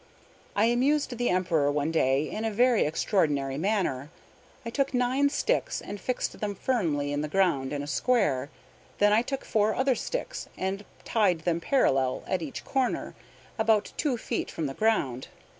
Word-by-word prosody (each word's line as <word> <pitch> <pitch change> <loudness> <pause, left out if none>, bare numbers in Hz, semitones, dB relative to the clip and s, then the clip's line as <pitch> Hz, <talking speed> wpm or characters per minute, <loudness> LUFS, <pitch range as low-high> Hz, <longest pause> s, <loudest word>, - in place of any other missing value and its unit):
I 205 - +4
amused 260 +3 +2
the 245 +1 0
Emperor 170 -6 +2
one 145 +2 0
day 140 -1 +2
in 215 - -4
a 225 - +1
very 240 +1 +3
extraordinary 150 -5 0
manner. 180 -8 0 0.6
I 230 - -4
took 275 +1 0
nine 255 +3 +2
sticks, - - 0
and 205 - -7
fixed 255 +4 -2
them 205 -1 -2
firmly 160 - 0
in 145 - -1
the 150 - -2
ground 150 -6 +1
in 145 -1 -3
a - - -5
square. 145 - +1 0.5
Then 205 0 +4
I 220 - +5
took 270 +2 -4
four 215 0 +1
other 260 0 +2
sticks, - - -4
and 195 +2 -3 0.2
tied 195 -7 +2
them 170 0 0
parallel 135 - +2
at 185 - -1
each 150 -4 -6
corner, 265 -2 -1 0.5
about 220 -1 +2
two 275 -6 0
feet - - -3
from 160 - -4
the 135 - -3
ground. 140 - 0
200 Hz, 170 wpm, -27 LUFS, 150-240 Hz, 0.6 s, I